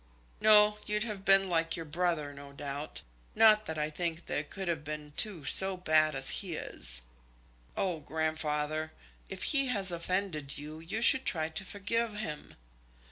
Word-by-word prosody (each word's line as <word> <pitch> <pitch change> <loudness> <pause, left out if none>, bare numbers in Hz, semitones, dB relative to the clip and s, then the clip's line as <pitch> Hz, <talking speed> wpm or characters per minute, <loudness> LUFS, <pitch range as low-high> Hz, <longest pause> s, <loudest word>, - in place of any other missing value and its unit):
"No; 210 -1 +5
you'd 210 0 0
have 210 -4 -5
been 195 0 +4
like 165 -2 0
your 165 -2 -6
brother, 160 -2 -1
no 140 0 -12
doubt. 145 +1 -5 0.3
Not 215 -1 +5
that 160 - -4
I 150 0 -2
think 170 +1 -3
there 145 - -2
could 190 +5 -6
have 165 -3 -2
been 150 -1 -7
two 185 -9 0
so 190 +7 +2
bad 155 -3 +2
as 135 0 +1
he 180 -5 -5
is." - - -2 0.7
"Oh, 180 -4 -1
grandfather, 155 0 -2 0.4
if - - -6
he 275 -2 +3
has 200 -7 0
offended 170 -4 -2
you, 150 +2 -8
you 195 +8 -3
should 265 +2 +10
try 160 -2 0
to 165 +4 -1
forgive 210 +3 -2
him." 165 -8 -6
165 Hz, 165 wpm, -30 LUFS, 150-195 Hz, 0.7 s, should